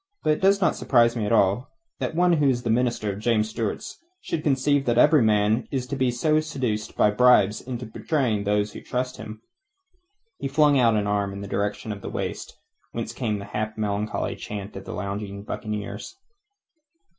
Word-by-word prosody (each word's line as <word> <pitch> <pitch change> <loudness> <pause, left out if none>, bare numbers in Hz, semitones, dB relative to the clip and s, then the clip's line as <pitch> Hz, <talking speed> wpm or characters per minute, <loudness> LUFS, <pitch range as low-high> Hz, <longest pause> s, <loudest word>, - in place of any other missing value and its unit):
But 155 - +3
it - - -5
does 195 +1 +4
not 180 - +3
surprise 120 -2 +3
me 110 -3 -1
at - - -2
all 105 +3 +2 0.3
that - - -3
one 175 +1 +4
who 150 -4 +3
is 120 -1 -1
a 115 - +1
minister 115 -3 0
of 100 - -8
James 110 -1 +1
Stuart's 110 -2 -4 0.2
should 165 - -3
conceive 140 -1 +2
that 120 -1 +1
every 150 +3 +6
man 105 +1 +2
is 130 -3 -2
to 140 - -4
be 130 -2 +1
seduced 130 -5 -1
by 105 - +4
bribes 105 -3 +4
into 125 -1 -6
betraying 115 -3 -1
those 105 +1 0
who - - -8
trust 125 0 -3
him." 110 +1 -9 1.0
He - - -2
flung 145 0 +4
out 115 -3 +4
an 105 -1 +1
arm 100 -1 0
in 100 - -7
the 100 - -6
direction 105 +2 -2
of 100 -1 -6
the - - -6
waist, - - -5 0.4
whence 115 -1 -4
came 115 -4 -2
the 100 - -7
half 110 +1 -4
melancholy 105 0 -2
chant 105 -1 -7
of 95 - -8
the - - -6
lounging 100 0 -5
buccaneers. 105 - -5
115 Hz, 190 wpm, -25 LUFS, 105-130 Hz, 1.0 s, every